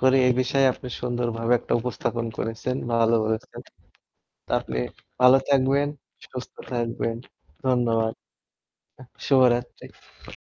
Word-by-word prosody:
করি 130 +1 +4
এ - - +4
বিষয়ে 135 +2 +2
আপনি 125 - -9
সুন্দরভাবে 120 -1 -1
একটা - - -5
উপস্থাপন 120 -1 -2
করেছেন। 115 +3 -2 0.2
ভালো 115 0 +3
করেছেন। 110 0 -3 0.9
তো - - -23
আপনি 65 -1 -5 0.4
ভালো 125 +1 +8
থাকবেন, 140 +1 +3 0.4
সুস্থ 130 -1 -8 0.2
থাকবেন। 115 -1 -2 0.5
ধন্যবাদ। 115 -3 +2 0.9
আহ 130 - -12 0.2
শুভরাত্রি। 125 -3 0
120 Hz, 110 wpm, -25 LUFS, 115-130 Hz, 0.9 s, ভালো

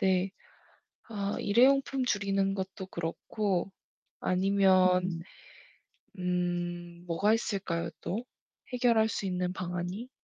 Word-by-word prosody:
네. 190 -1 +2 0.8
아 200 -2 -2
일회용품 265 +4 +4
줄이는 195 -3 +1
것도 190 0 -4
그렇고 185 +3 -2 0.5
아니면 185 -2 +3 1.0
음 175 -1 -2
뭐가 190 +6 +2
있을까요 195 -7 -1
또. 220 +7 -2 0.5
해결할 235 -3 +4
수 200 -2 -2
있는 180 0 -1
방안이? 180 +6 -4
190 Hz, 200 characters per minute, -30 LUFS, 180-205 Hz, 1.0 s, 일회용품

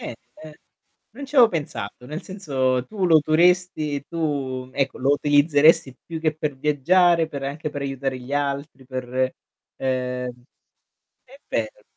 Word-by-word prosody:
Eh, - - -6 0.3
ehm, 155 - -10 0.6
con 275 +4 -8
ci 295 - -13
avevo 240 -4 +8
pensato, 125 - -5
nel 155 +4 -6
senso 130 -10 -1
tu 205 -4 -3
lo 165 -2 +6
utoresti 155 -2 +2
tu, 135 -6 -3
ecco, 135 -1 -1
lo 135 +2 +1
utilizzeresti 145 -1 +4
più 165 -1 -5
che 155 -2 0
per 150 -3 -3
viaggiare, 165 +4 +3
per 140 -2 -6
anche 145 +3 -4
per 145 -1 -5
aiutare 135 -1 -3
gli 130 +3 -9
altri, 140 -1 -3
per 130 0 -2 0.4
ehm 125 -1 -3 0.8
è 265 +2 -17
vero. 110 -2 -3
145 Hz, 145 wpm, -23 LUFS, 130-160 Hz, 0.8 s, avevo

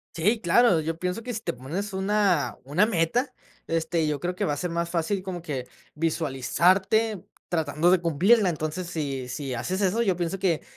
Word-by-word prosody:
Sí, 210 +7 +1
claro, 190 0 +4
yo 160 +1 -3
pienso 180 +5 -3
que 245 +2 -5
si 220 - -4
te - - -3
pones 165 - -5
una 190 -4 +1
una 150 +10 +2
meta, 225 +7 +1 0.4
este, 165 0 0
yo 150 -1 -1
creo 175 +5 -2
que - - -2
va 150 - +1
a - - -4
ser 180 +2 -3
más 170 0 -1
fácil 175 +3 -1
como 185 -2 -5
que 135 -6 -4 0.3
visualizarte 175 - +1 0.2
tratando 160 0 +1
de 185 - +5
cumplirla, 185 +6 +4
entonces, 155 +2 -3
si 140 -6 -3
si 135 +1 -4
haces 180 +12 -2
eso, 200 +4 +2
yo 195 -6 +2
pienso 175 +2 -2
que 175 -6 +1
175 Hz, 190 wpm, -26 LUFS, 155-195 Hz, 0.4 s, de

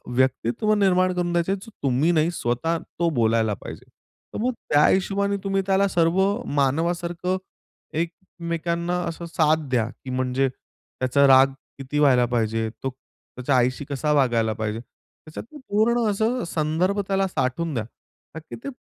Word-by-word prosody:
व्यक्तित्व 130 - +1
निर्माण 185 -2 +3
करून 175 -1 -1
द्यायचा 175 +2 +1
आहे, 195 - -1
जो 225 - -13
तुम्ही 140 +5 +2
नाही 160 +1 +2
स्वतः 155 +4 -1 0.2
तो 170 -1 +3
बोलायला 110 -1 +2
पाहिजे. - - -9 0.5
तर, - - -4
मग 250 +3 0 0.2
त्या 145 +1 +5
हिशोबाने 200 +1 +1
तुम्ही 195 0 0
त्याला 195 +1 +3
सर्व 170 +1 +2 0.3
मानवासारखं, 170 +6 0 0.6
एकमेकांना 170 +1 -3
असं 170 +1 -7
साथ 160 -2 +1
द्या, 120 -3 +1
की 130 +1 -12
म्हणजे 130 +1 0
त्याचा 130 +2 -1
राग 135 0 +6 0.3
किती 140 +2 -3
व्हायला 130 -4 +5
पाहिजे? 115 -2 -1
तो 135 - 0 0.5
त्याच्या 130 +2 0
आईशी 130 +3 +1
कसा 145 +2 -1
वागायला 120 -6 +2
पाहिजे? 110 0 -3
त्याच्यात 155 +5 -13
ना 295 - -10
पूर्ण 225 +3 +2
असं 225 +4 0
संदर्भ 170 +6 0
त्याला 195 0 +1
साठवून 165 0 -2
द्या. 115 - -1 0.5
का 160 - -6
की 160 - -10
ते - - -4
160 Hz, 155 wpm, -24 LUFS, 130-185 Hz, 0.6 s, राग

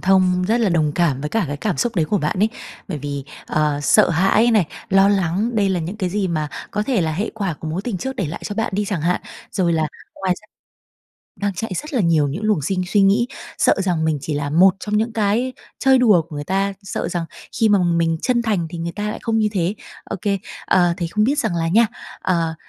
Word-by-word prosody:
thông, 185 -1 +3
rất 235 +2 +2
là 220 - +3
đồng 155 -4 +1
cảm 150 -6 +1
với 150 - -3
cả 225 -3 +1
cái 145 - -3
cảm 190 +3 -2
xúc 235 -4 -1
đấy 165 - +3
của 200 +6 0
bạn 150 +3 -1
ấy, 215 +3 +4 0.4
bởi 160 -6 -3
vì, 140 -1 -5 0.2
ờ, 150 -1 0
sợ 210 +7 +5
hãi 195 +7 +3
này, 215 -7 +3 0.2
lo 195 +1 +5
lắng, 195 +3 +1
đây 205 -3 +2
là 180 -2 0
những 180 +6 -5
cái 185 -3 -1
gì 195 0 -1
mà 155 -3 -1 0.2
có 210 - -1
thể 240 -2 +1
là 160 -2 0
hệ 200 +8 -2
quả 195 -6 -2
của 160 - -5
mối 170 +5 -3
tình 205 -5 -3
trước 265 +5 -4
để 195 -9 -1
lại 155 - -6
cho 205 - -4
bạn 225 -1 -1
đi 205 +1 0
chẳng 190 -5 -2
hạn. 180 +2 +1 0.3
Rồi 180 -4 +1
là 160 -1 +1 0.3
ngoài 185 -2 0
ra 215 - -22 0.9
đang 200 -1 -1
chạy 205 +3 -4
rất 300 - -5
là 250 - +2
nhiều 165 -5 +3
những 170 +10 -4
luồng 210 -9 +1
sinh 185 +5 -1
suy 205 +2 +2
nghĩ, 205 +5 +4 0.3
sợ - - +4
rằng 175 -4 0
mình 155 -2 +1
chỉ 150 +1 -3
là 145 0 -2
một 185 +5 +5
trong 210 0 -1
những 225 +2 0
cái 225 +4 +1 0.3
chơi 265 -1 +5
đùa 210 -9 +5
của 155 -2 -10
người 145 - -4
ta, 195 +4 0
sợ 195 - -3
rằng 175 -1 -2 0.4
khi 225 - +5
mà 205 - +5
mình 170 -2 +1
chân 245 -2 +2
thành 205 -7 0
thì 175 - -6
người 170 +1 -3
ta 210 +1 -3
lại - - -5
không 225 -1 0
như 215 -1 +2
thế, 185 +1 0 0.3
ô - - -4
kê. 200 -2 +1 0.3
Ờ, 175 -2 +3
thì 170 -3 -2
không 210 +5 +1
biết 280 +4 +1
rằng 185 - 0
là 165 0 0
nha, 225 +6 +5 0.3
ờ, 165 -3 0
190 Hz, 255 wpm, -20 LUFS, 165-210 Hz, 0.9 s, sợ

